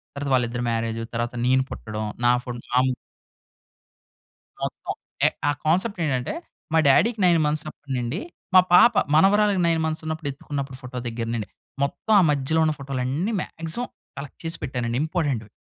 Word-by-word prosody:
తర్వాత 140 0 -3
వాళ్ళిద్దరి 120 0 0
మ్యారేజ్, 115 0 -1
తర్వాత 120 +1 -2
నేను 130 +1 +4
పుట్టడం 110 -1 -5 0.2
నా 120 - +6
ఫోటో 120 -1 -5
నా 125 - +5 1.8
మొత్తం - - -3 0.3
ఎ - - +6 0.2
ఆ - - +4
కాన్సెప్ట్ 185 +6 +1
ఏంటంటే 130 - -1 0.4
మా - - +6
డ్యాడీకి 215 - +4
9 175 -2 +5
మంత్స్ 150 0 0
అప్పటి 145 -2 -9
నుండి, 125 - -2 0.3
మా 185 - +10
పాప 235 +6 +8 0.2
మనవరాలకి 200 +3 +4
9 165 -1 +2
మంత్స్ 160 0 -2
ఉన్నప్పుడు 160 -1 -3
ఎత్తుకున్నప్పుడు 140 -1 -5
ఫోటో 125 0 -6
దగ్గర 115 0 -3
నుండి 110 -3 -3 0.3
మొత్తం 180 +9 -1
ఆ - - +5
మధ్యలో 145 +3 +1
ఉన్న 155 - +2
ఫోటోలన్నీ 140 - -2
మాక్సిమం 165 +9 -4 0.3
కలెక్ట్ 140 -1 -8
చేసి 165 +1 -3
పెట్టానండి 120 -2 -2
ఇంపార్టెంట్‌వి. 145 - -1
140 Hz, 155 wpm, -24 LUFS, 125-165 Hz, 1.8 s, మా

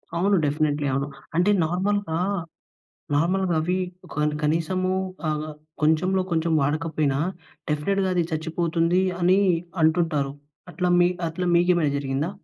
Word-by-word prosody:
అవును. 195 +4 +2
డెఫినిట్లీ 145 0 0
అవును. 140 +1 -1 0.3
అంటే 180 +5 +3
నార్మల్‌గా, 185 0 -1 1.0
నార్మల్‌గా 175 +4 +1
అవి 180 +4 0 0.4
కని 150 0 0
కనీసము 170 +5 0 0.4
ఆహ్, 155 0 -2 0.3
కొంచెంలో 180 +5 +2
కొంచెం 165 0 +1
వాడకపోయినా 150 -1 0 0.5
డెఫినిట్‌గా 190 +6 0
అది 175 -2 +2
చచ్చిపోతుంది 165 +2 0 0.2
అని 185 +3 +4 0.4
అంటుంటారు. 160 -4 +2 0.4
అట్లా 180 0 0
మి 175 - +5 0.2
అట్లా 180 +3 -3
మీకేమైనా 175 -4 +3
జరిగిందా? 140 +4 -2
165 Hz, 110 wpm, -24 LUFS, 150-180 Hz, 1.0 s, మి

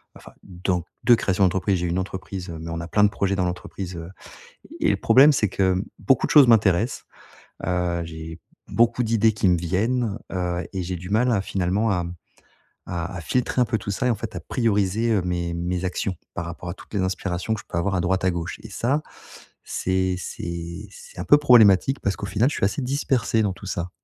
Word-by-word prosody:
Enfin - - -14
donc 90 -1 -2 0.2
de 120 - +6
création 95 -3 0
d'entreprise. 95 +1 +2
J'ai 90 - -2
une 85 +2 -1
entreprise, 95 -1 -6
heu, 80 - -6
mais 80 +1 -6
on 85 0 -4
a 85 - -6
plein 105 +4 +2
de 105 - +6
projets 100 -1 -1
dans 90 -2 0
l'entreprise, 90 +1 -5
heu 85 0 -7 0.7
et - - +3
le - - +2
problème, 140 +4 +6
c'est 110 -8 +1
que 95 0 +1 0.2
beaucoup 135 - +2
de - - -4
choses 145 -4 +8
m'intéressent, 110 -1 +3 0.6
heu, 90 -1 -1
j'ai 80 0 -8 0.3
beaucoup 120 +1 +2
d'idées 110 -1 +3
qui 100 -1 +1
me 90 - +3
viennent, 105 +6 0
heu 90 -1 -2
et 95 - -2
j'ai 90 +1 -3
du 90 +2 -9
mal 120 +5 +2
à 105 -4 +2
finalement 95 +3 0
à, 90 -3 0
mmh, 85 +1 -7 0.7
à 90 +1 -4
à - - -6
filtrer 125 +9 -1
un - - +4
peu 110 0 -1
tout 100 - -4
ça 115 +6 -1
et - - +2
en - - +1
fait 100 - -7
à - - -3
prioriser, 110 +2 0
heu, 100 - +2
mes 85 -1 -2
mes 90 +1 -2
actions 90 +1 -2 0.2
par 85 - -3
rapport 85 +1 -7
à - - -3
toutes - - -16
les 100 - 0
inspirations 95 +2 -2
que - - -7
je - - -27
peux - - -4
avoir 95 +3 0
à 90 - +1
droite 95 +2 0
à 95 - +3
gauche 85 +3 -5
et 110 - -9
ça 130 +9 0 0.6
c'est 95 0 -1
c'est 85 0 -6
c'est 485 0 -13
un - - -4
peu 145 - +7
problématique 125 -2 +5
parce 100 -2 0
qu'au 100 - -5
final, 110 +7 +2
je - - -4
suis - - +1
assez 105 +8 -1
dispersé 130 -3 0
dans 100 - +1
tout 95 - -12
ça. 90 -1 -3
95 Hz, 225 wpm, -23 LUFS, 90-110 Hz, 0.7 s, choses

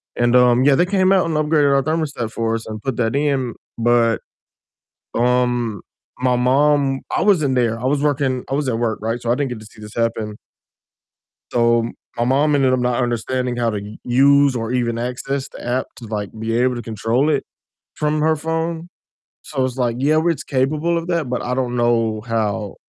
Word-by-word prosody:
and, 120 0 +2
um, 125 0 +5
yeah, 140 -1 +5
they 175 - +3
came 190 0 +2
out 190 -3 +4
and 165 -2 -2
upgraded 150 -2 +3
our 135 - +2
thermostat 150 -8 -2
for 115 0 -1
us 115 - -5
and 110 -1 -6
put 135 -4 -2
that 115 +2 0
in, 135 -5 0 0.2
but, 115 -1 +3 1.0
um, 120 -3 +1 0.4
my 125 -1 +2
mom 135 +2 +2 0.2
I - - +1
wasn't 155 -10 +3
there, 115 -2 +1
I - - -7
was 140 +1 +1
working 135 -3 0
I - - 0
was 145 -2 -1
at 115 -2 0
work, 115 -2 -1
right, 115 +2 -2
so 120 - -1
I - - +3
didn't 140 0 -1
get 120 -3 -6
to 110 - -12
see 110 - -16
this 105 0 -10
happen. 115 -2 -2 1.1
So 115 -1 +2 0.3
my 120 - +1
mom 145 +4 +2
ended 135 -2 +3
up 130 - +2
not 125 0 0
understanding 120 +1 -1
how 120 -1 +1
to 105 -2 -3
u 105 +1 -10
use 140 +2 +4
or 115 0 -3
even 120 -2 0
access 130 +3 -3
the - - -11
app 125 +2 0
to 120 - -11
like 105 -2 -4
be 115 +1 -2
able 125 0 +2
to 120 - -5
control 115 +6 0
it 145 - 0 0.5
from 150 0 0
her 160 +1 +2
phone, 165 +2 -3 0.5
so 135 -3 -2
it's 130 0 -4
like, 120 -2 0
yeah, 155 +3 +3
it's 165 - 0
capable 150 +5 0
of 165 +1 -4
that, 170 -6 -1
but 125 - -2
I 125 - -2
don't 125 -2 -1
know 115 -2 +1
how 110 -3 -2
125 Hz, 205 wpm, -20 LUFS, 115-145 Hz, 1.1 s, um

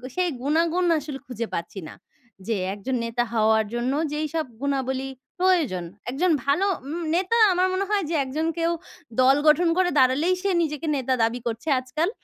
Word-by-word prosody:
সেই 365 -1 +1
গুনাগুন 330 +5 +1
আসলে 280 -2 -7
খুঁজে 235 -3 -4
পাচ্ছি 170 +3 -4
না। - - -10 0.5
যে 225 - +1 0.2
একজন 230 +6 -3
নেতা 235 +1 0
হওয়ার 220 0 +3
জন্য 240 +2 -1 0.2
যেইসব 310 +1 -2 0.2
গুণাবলী 270 -1 -1 0.3
প্রয়োজন। 335 - +2 0.3
একজন 335 +7 +1
ভালো 290 +8 +2 0.2
উম 330 +4 -4
নেতা 380 +6 +1 0.2
আমার 365 +1 +2
মনে 390 +1 0
হয় 415 -2 +1
যে 335 - -1
একজন 305 +5 -2
কেউ, 335 0 +1 0.5
দল 265 +2 +6
গঠন 325 +3 +5
করে 370 -1 +3
দাঁড়ালেই 275 +8 +3
সে 400 - 0
নিজেকে 300 0 -2
নেতা 260 0 0
দাবি 230 +2 0
করছে 230 +7 -4
আজকাল। 305 +8 -1
290 Hz, 165 wpm, -24 LUFS, 255-345 Hz, 0.5 s, দল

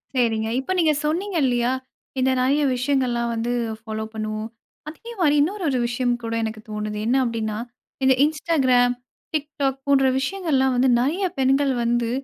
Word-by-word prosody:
சரிங்க. 225 -3 +1
இப்ப 265 - -4
நீங்க 315 -3 +4
சொன்னீங்க 360 +6 -1
இல்லியா! 245 -1 +1 0.5
இந்த 260 +1 +3
நிறைய 270 +4 +2
விஷயங்கள்லாம் 250 -2 0
வந்து 230 +1 -2 0.3
ஃபாலோ 220 0 -4
பண்ணுவோம். 215 0 -4 0.4
அதேமாரி 350 -3 -1
இன்னொரு 380 +6 -1
ஒரு 260 -2 0
விஷயம் 245 +1 0
கூட 230 0 -3
எனக்கு 220 -1 -4
தோணுது. 210 0 -4
என்ன 240 +3 +2
அப்பிடின்னா, 220 -3 -2 0.5
இந்த 265 0 +6
Instagram, 275 -6 +2 0.4
TikTok 285 -3 -1
போன்ற 275 -1 +4
விஷயங்கள்லாம் 275 -4 0
வந்து 255 +1 +3
நிறைய 330 +10 0
பெண்கள் 270 +1 +3
வந்து 235 0 +1
260 Hz, 140 wpm, -23 LUFS, 235-295 Hz, 0.5 s, இந்த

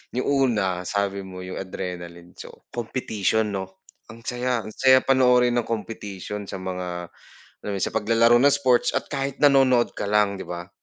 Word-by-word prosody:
Yung 125 - -1 0.2
una 95 -4 -1
sabi 100 -1 -2
mo 90 -1 -9
yung 95 - -6
adrenaline, 90 -2 -7
so - - -9 0.2
competition 110 -3 -1
no? 95 -1 -6 0.2
Ang 115 +1 -12
saya, 125 0 -1
ang 110 - -8
saya 130 +3 +5
panoorin 125 -2 +3
ng 120 - 0
competition 105 -2 -5
sa 95 -1 -7
mga 90 -2 -5 0.6
ano 100 -1 -2
sa - - +1
paglalaro 115 +2 +4
ng 140 +3 +5
sports 130 -4 +2
at - - -2
kahit 140 -1 -3
nanonood 135 -4 +4
ka - - -2
lang, 105 -1 +2
'di - - -7
ba? 85 0 -6
105 Hz, 165 wpm, -24 LUFS, 95-125 Hz, 0.6 s, saya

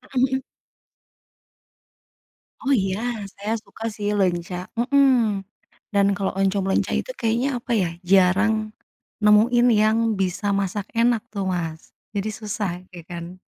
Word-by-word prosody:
Mhm 250 - +3
mhm. 265 0 +1 2.2
Oh, 275 - +3
iya 195 -4 +1 0.4
saya 210 +3 -2
suka, 225 - -9
sih, 205 -1 -3
leunca, 180 -1 -1
mhm, 240 -5 +3 0.5
dan 200 -1 +4
kalau 195 -1 -1
oncom 195 0 +1
leunca 190 - +1
itu - - -3
kayaknya 245 - -1
apa, 240 - -6
ya, 185 -4 +1
jarang 200 +4 +3 0.5
nemuin 225 +4 +5
yang 215 +1 +3 0.2
bisa 190 +2 -1
masak 200 +1 -3
enak, 235 -1 +3
tuh, 200 -3 -3
Mas, 160 -2 -5 0.2
jadi 205 +2 -1
susah, 210 -3 -3 0.2
ya, 175 -2 -10
kan. 175 +1 -8
205 Hz, 130 wpm, -23 LUFS, 190-225 Hz, 2.2 s, nemuin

